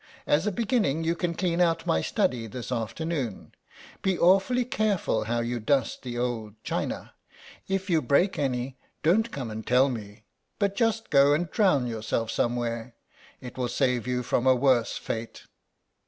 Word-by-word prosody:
As 155 +7 +2
a - - +2
beginning 205 - 0
you 165 +1 +1
can 170 -1 -2
clean 175 -1 0
out 165 -1 +2
my 80 - +2
study 115 +5 0
this 120 +3 -7
afternoon. 125 - -3 0.5
Be 190 -2 +1
awfully 195 +8 +4
careful 210 - 0
how 120 +1 0
you 120 +1 -2
dust 125 +2 0
the 120 -2 -5
old 115 -4 -3
china. - - -3 0.5
If 195 0 -1
you 165 -4 +2
break 150 +9 +2
any 130 -1 -2 0.2
don't 210 +9 +3
come 125 - -5
and 110 +1 -5
tell 125 +5 +4
me 105 -3 -7 0.3
but 200 -1 0
just 225 -1 0
go 140 0 +6
and 170 +2 -2
drown 185 - +3
yourself 115 -1 -2
somewhere; 120 0 -2 0.5
it 125 0 -9
will 125 -1 0
save 125 -2 0
you 125 0 -1
from 125 +1 0
a 130 - +6
worse 125 -2 +2
fate." 115 +1 -5
130 Hz, 165 wpm, -27 LUFS, 120-175 Hz, 0.5 s, go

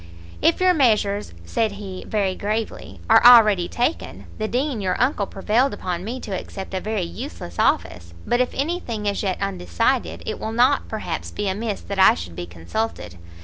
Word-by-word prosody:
"If 330 - +3
your 370 0 +4
measures," 210 - +2
said 215 - 0
he, 195 -2 -7
very 200 -3 0
gravely, 210 - -4
"are - - +6
already 215 -7 +7
taken, 245 +7 -2
the 215 - -1
Dean 255 -1 -1
your 185 -2 -1
uncle 245 -6 +1
prevailed 225 +7 +1
upon 180 -1 -4
me 240 +5 -4
to 210 - -7
accept 190 +1 -6
a 190 - 0
very 215 -3 -2
useless 170 - -7
office; 85 -1 0
but 240 +1 +2
if 255 - +1
any 335 +6 -1
thing 220 -9 -5
is 200 -1 0
yet 190 -3 -1
undecided, 85 -3 -1
it - - -4
will 220 - -4
not, 255 +5 +3
perhaps, 220 - -4
be 205 - -3
amiss 205 +2 -2
that 200 -1 -5
I 190 - +7
should 85 0 -8
be 85 +1 -6
consulted. 85 - -5
210 Hz, 185 wpm, -22 LUFS, 185-235 Hz, -, already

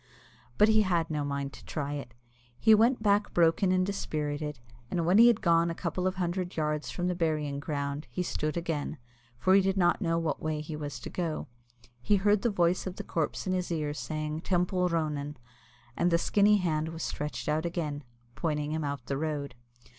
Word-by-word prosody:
But 210 - +6
he 220 0 +5
had 170 -5 +1
no 150 -1 -1
mind 140 -1 -3
to - - -12
try 145 -1 -3
it. 135 -5 -7 0.4
He 220 - +6
went 225 +2 +4
back 205 0 +2
broken 170 +2 +4
and 185 0 +3
dispirited, 150 -7 -3 0.3
and 170 -2 -1
when 185 +5 +5
he 235 - +9
had 235 -3 +4
gone 170 -1 +4
a 165 - -3
couple 180 +2 -2
of 185 - -1
hundred 180 0 -2
yards 150 -1 -1
from 175 - -3
the 180 - +1
burying 155 -4 -1
ground, 145 0 -3
he 180 - -2
stood 155 -2 -2
again, 165 -3 -2 0.4
for 185 +10 +3
he 195 - +7
did 195 0 0
not 175 +2 +3
know 165 -3 +1
what 165 -2 -1
way 155 -1 -1
he 150 +1 -5
was 145 -5 -5
to - - -7
go. 165 -4 -2 0.6
He 205 - +3
heard 205 +1 +3
the 235 - +2
voice 180 -2 +1
of 185 - -5
the - - -6
corpse 160 -3 -2
in 185 - 0
his 180 -1 -2
ear, 150 -3 -1
saying 155 +1 -4
"Teampoll 180 0 +1
Ronan," 150 -3 -2 0.6
and 175 - +2
the 170 - +4
skinny 205 +4 +4
hand 160 -4 0
was 165 0 -6
stretched 150 0 -4
out 155 +2 +1
again, 150 -4 -3 0.3
pointing 150 0 -2
him 160 0 -1
out 140 -4 -4
the 135 - -2
road. 145 -3 -3
165 Hz, 205 wpm, -29 LUFS, 150-185 Hz, 0.6 s, he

